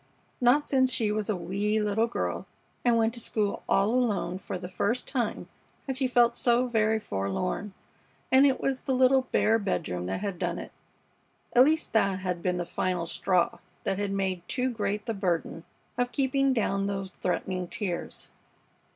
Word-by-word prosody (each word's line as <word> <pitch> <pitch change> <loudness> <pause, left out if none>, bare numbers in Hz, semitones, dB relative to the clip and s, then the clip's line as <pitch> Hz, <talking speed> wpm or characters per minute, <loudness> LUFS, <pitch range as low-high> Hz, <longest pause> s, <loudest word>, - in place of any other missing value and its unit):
Not 255 +5 +4
since 260 -2 +3
she 220 -4 +1
was 210 0 -2
a 210 - +2
wee 200 +5 -1
little 210 +2 +1
girl 235 - -3 0.4
and 240 -1 +4
went 225 0 +2
to 235 - -5
school 210 -3 -1
all 195 +2 +3
alone 220 -7 0
for 185 - -5
the 180 0 -7
first 205 +6 -1
time 240 -6 -2 0.4
had 265 - -3
she 260 0 0
felt 240 -1 +4
so 240 +1 +3
very 220 -2 +2
forlorn, 180 - -3 0.6
and 265 +2 +7
it 265 - +1
was 270 -1 -1
the 265 - -1
little 260 0 +4
bare 225 +1 +3
bedroom 90 - -2
that 95 - -3
had 200 -4 -3
done - - -1
it. - - -7 0.8
At 250 +1 +7
least 315 +2 0
that 195 -4 +3
had 180 -2 -3
been 180 +1 0
the 175 - -2
final 180 0 -1
straw 175 +1 +1 0.2
that 195 - -1
had 205 -1 -1
made 190 -2 -1
too 255 0 0
great 210 -2 -2
the 230 - -1
burden 175 -4 -2 0.3
of 245 0 +1
keeping 275 0 +2
down 195 -5 0
those 195 -1 -3
threatening 185 0 -1
tears. 180 -2 -4
210 Hz, 175 wpm, -28 LUFS, 185-245 Hz, 0.8 s, and